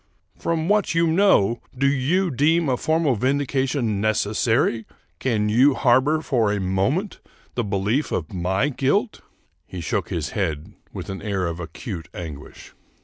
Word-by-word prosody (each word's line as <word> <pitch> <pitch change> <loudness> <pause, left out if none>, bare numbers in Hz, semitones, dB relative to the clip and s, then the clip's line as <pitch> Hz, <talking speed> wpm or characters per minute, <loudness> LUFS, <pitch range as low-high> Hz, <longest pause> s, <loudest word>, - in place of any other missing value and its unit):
" 90 - -36
From 165 -1 0
what 205 -3 +2
you 165 0 +4
know, 160 - +3 0.2
do 135 - +1
you 145 +7 +1
deem 155 +4 +2
a 130 - +2
formal 155 -1 +1
vindication 130 -3 0
necessary? 110 +2 +1 0.3
Can 110 -5 0
you 130 +6 +4
harbor 135 +4 +3
for 115 -9 +1
a 105 - -1
moment 100 - -1 0.3
the 120 - -1
belief 105 +7 -1
of 80 0 -3
my 95 +9 0
guilt? 145 - 0 0.2
" - - -44
He 95 - -7
shook 85 - -2
his - - -3
head 80 +6 -3 0.2
with 95 -1 -6
an 95 - -6
air 100 -3 -1
of 85 0 -4
acute 85 -1 -7
anguish. 75 -4 -9
120 Hz, 155 wpm, -23 LUFS, 100-145 Hz, 0.3 s, you